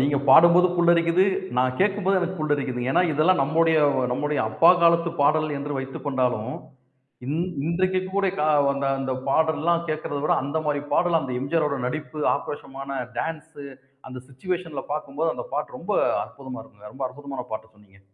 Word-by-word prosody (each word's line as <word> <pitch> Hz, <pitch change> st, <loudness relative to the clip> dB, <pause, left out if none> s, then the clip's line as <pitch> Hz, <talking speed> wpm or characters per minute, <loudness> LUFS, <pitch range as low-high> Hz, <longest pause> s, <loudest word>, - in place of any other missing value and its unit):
நீங்கப் 140 Hz, +1 st, +1 dB
பாடும்போது 170 Hz, +5 st, +7 dB
புல்லரிக்குது. 170 Hz, +1 st, +4 dB, 0.3 s
நான் 130 Hz, 0 st, +1 dB
கேட்கும்போது 195 Hz, -1 st, +2 dB
எனக்குப் 180 Hz, 0 st, -3 dB
புல்லரிக்குது. 140 Hz, -5 st, -1 dB
ஏன்னா 180 Hz, -, +3 dB
இதெல்லாம் 155 Hz, +1 st, +3 dB
நம்முடைய 160 Hz, +2 st, +2 dB, 0.4 s
நம்முடைய 150 Hz, +3 st, -1 dB
அப்பா 165 Hz, +11 st, +5 dB
காலத்து 170 Hz, 0 st, +4 dB
பாடல் 155 Hz, +2 st, +3 dB
என்று 145 Hz, 0 st, -4 dB
வைத்துக்கொண்டாலும், 130 Hz, -3 st, -2 dB, 0.7 s
இன் 150 Hz, +4 st, -2 dB, 0.3 s
இன்றைக்கு 185 Hz, +3 st, +1 dB, 0.2 s
கூட 200 Hz, -1 st, +2 dB, 0.7 s
அந்தப் 130 Hz, -1 st, -4 dB
பாடல்லாம் 160 Hz, +3 st, +1 dB
கேட்கிறத 155 Hz, -2 st, -3 dB
விட, -, -, +2 dB
அந்த 140 Hz, +3 st, -2 dB
மாதிரி 145 Hz, -1 st, 0 dB
பாடல் 175 Hz, -2 st, +2 dB
அந்த 130 Hz, -, -5 dB
எம்.ஜி.ஆர் 150 Hz, +3 st, 0 dB
ஓட 140 Hz, -1 st, -3 dB
நடிப்பு, 155 Hz, +3 st, -5 dB
ஆக்ரோஷமான 135 Hz, -1 st, -6 dB, 0.2 s
டான்ஸ், 160 Hz, -2 st, -5 dB, 0.5 s
அந்த 130 Hz, 0 st, -8 dB
சுவிச்சுவேஷன்ல 160 Hz, +2 st, -5 dB
பார்க்கும் 150 Hz, -1 st, -6 dB
போது 165 Hz, 0 st, +2 dB
அந்தப் -, -, -8 dB
பாட்டு -, -, -4 dB
ரொம்ப -, -, -4 dB, 0.3 s
அற்புதமா 130 Hz, -2 st, -9 dB
இருக்குங்க. 105 Hz, -1 st, -15 dB
ரொம்ப 135 Hz, 0 st, -4 dB
அற்புதமான 140 Hz, -1 st, -7 dB
பாட்ட 110 Hz, 0 st, -6 dB
சொன்னீங்க. 100 Hz, -2 st, -23 dB
150 Hz, 150 wpm, -24 LUFS, 135-170 Hz, 0.7 s, பாடும்போது